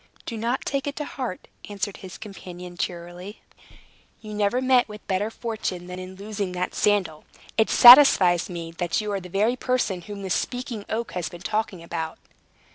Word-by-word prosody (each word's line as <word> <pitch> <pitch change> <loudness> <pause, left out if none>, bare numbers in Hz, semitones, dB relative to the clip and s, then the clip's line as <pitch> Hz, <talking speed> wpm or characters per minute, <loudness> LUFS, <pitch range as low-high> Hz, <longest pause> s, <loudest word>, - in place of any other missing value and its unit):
"Do 230 - -5
not 235 +4 -2
take 275 0 -2
it 285 - -3
to 295 - -4
heart," 250 -11 -6 0.2
answered 205 -1 -4
his 190 -1 -10
companion 180 -4 -9
cheerily. 175 +3 -6 0.8
"You 215 -1 -9
never 210 +3 +1
met 255 -1 +3
with 210 0 -10
better 195 +3 -1
fortune 220 -6 -4
than 180 0 -7
in 185 0 -8
losing 200 -1 -4
that 180 0 -3
sandal. 190 -7 +1 0.3
It 220 - +3
satisfies 240 - +8
me 170 -2 -6
that 175 -2 0
you 210 -1 -3
are 200 - -1
the 180 -1 -11
very 210 +7 +1
person 250 -8 -1
whom 200 +2 -8
the 190 - -4
Speaking 245 0 -3
Oak 230 +2 -2
has 180 -2 -3
been 175 - -11
talking 205 -3 -2
about." 165 -1 -4
200 Hz, 180 wpm, -24 LUFS, 180-225 Hz, 0.8 s, satisfies